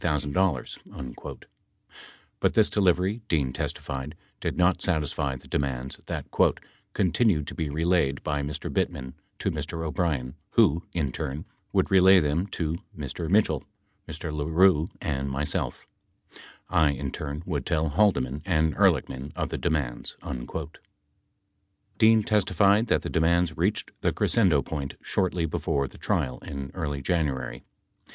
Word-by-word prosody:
7 75 Hz, -1 st, 0 dB, 2.1 s
But -, -, +1 dB
this 110 Hz, -2 st, +4 dB
delivery, 95 Hz, +2 st, +2 dB
Dean 70 Hz, -8 st, +1 dB
testified, 70 Hz, +2 st, -4 dB, 0.2 s
did -, -, -3 dB
not 90 Hz, +1 st, +3 dB
satisfy 75 Hz, -5 st, 0 dB
the 65 Hz, -, -12 dB
demands 65 Hz, -2 st, -2 dB
that -, -, -3 dB, 0.7 s
"continued 95 Hz, -4 st, +2 dB
to -, -, -6 dB
be 80 Hz, -2 st, -2 dB
relayed 80 Hz, -2 st, +1 dB
by 75 Hz, -1 st, -1 dB
Mr. 70 Hz, +1 st, -4 dB
Bittman 65 Hz, 0 st, -1 dB, 0.2 s
to -, -, -1 dB
Mr. 80 Hz, +2 st, -4 dB
O'Brien 70 Hz, -5 st, -1 dB, 0.2 s
who, 85 Hz, -8 st, +4 dB
in 75 Hz, -6 st, -1 dB
turn, 65 Hz, +4 st, -4 dB, 0.3 s
would -, -, +1 dB
relay 95 Hz, 0 st, +7 dB
them 80 Hz, +4 st, 0 dB
to 80 Hz, -4 st, -2 dB, 0.2 s
Mr. 75 Hz, +3 st, -4 dB
Mitchell, 95 Hz, -7 st, +3 dB, 0.4 s
Mr. 80 Hz, 0 st, -5 dB
LaRue, 80 Hz, +2 st, +3 dB
and 70 Hz, -6 st, -2 dB
myself. 70 Hz, +2 st, -2 dB, 0.8 s
I, 80 Hz, -2 st, +4 dB
in 70 Hz, -1 st, -2 dB
turn, 75 Hz, +2 st, -5 dB
would 75 Hz, -6 st, -2 dB
tell 80 Hz, -2 st, +1 dB
Haldeman 75 Hz, -7 st, +2 dB
and 80 Hz, -4 st, +1 dB
Ehrlichman 65 Hz, +3 st, +2 dB
of -, -, -2 dB
the -, -, -3 dB
demands." 70 Hz, -7 st, -2 dB
8 -, -, -5 dB, 1.5 s
Dean 110 Hz, 0 st, +6 dB
testified 100 Hz, +1 st, +3 dB
that -, -, +2 dB
the -, -, -3 dB
demands 85 Hz, +1 st, +2 dB
reached 100 Hz, +5 st, 0 dB
the -, -, +2 dB
crescendo 90 Hz, -, +3 dB
point 70 Hz, -3 st, -4 dB
shortly 90 Hz, -3 st, 0 dB
before 70 Hz, -3 st, -1 dB
the -, -, -14 dB
trial 65 Hz, -, -1 dB
in 70 Hz, -1 st, -6 dB
early 70 Hz, -6 st, -3 dB
January. 70 Hz, -8 st, -1 dB
80 Hz, 135 wpm, -27 LUFS, 70-90 Hz, 2.1 s, relay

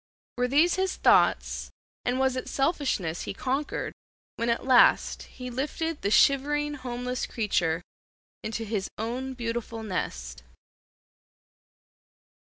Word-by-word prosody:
Were 250 Hz, -, +3 dB
these 310 Hz, +8 st, +4 dB
his 380 Hz, 0 st, 0 dB
thoughts, -, -, +3 dB, 0.4 s
and 245 Hz, +1 st, +1 dB
was 265 Hz, -1 st, +2 dB
it 255 Hz, -, -4 dB
selfishness 270 Hz, -, 0 dB
he -, -, -5 dB
conquered 270 Hz, +6 st, -2 dB, 0.4 s
when 230 Hz, +1 st, -1 dB
at 235 Hz, -, 0 dB
last 255 Hz, -2 st, +5 dB, 0.2 s
he 250 Hz, -1 st, -6 dB
lifted 300 Hz, +5 st, -2 dB
the 200 Hz, -, 0 dB
shivering 295 Hz, +5 st, +3 dB
homeless 250 Hz, -2 st, -3 dB
creature 175 Hz, -6 st, 0 dB, 0.6 s
into 225 Hz, +1 st, -3 dB
his 205 Hz, -3 st, -2 dB
own 250 Hz, +4 st, -3 dB
beautiful 230 Hz, -1 st, -4 dB
nest? 65 Hz, -, -4 dB
250 Hz, 115 wpm, -27 LUFS, 220-275 Hz, 0.6 s, last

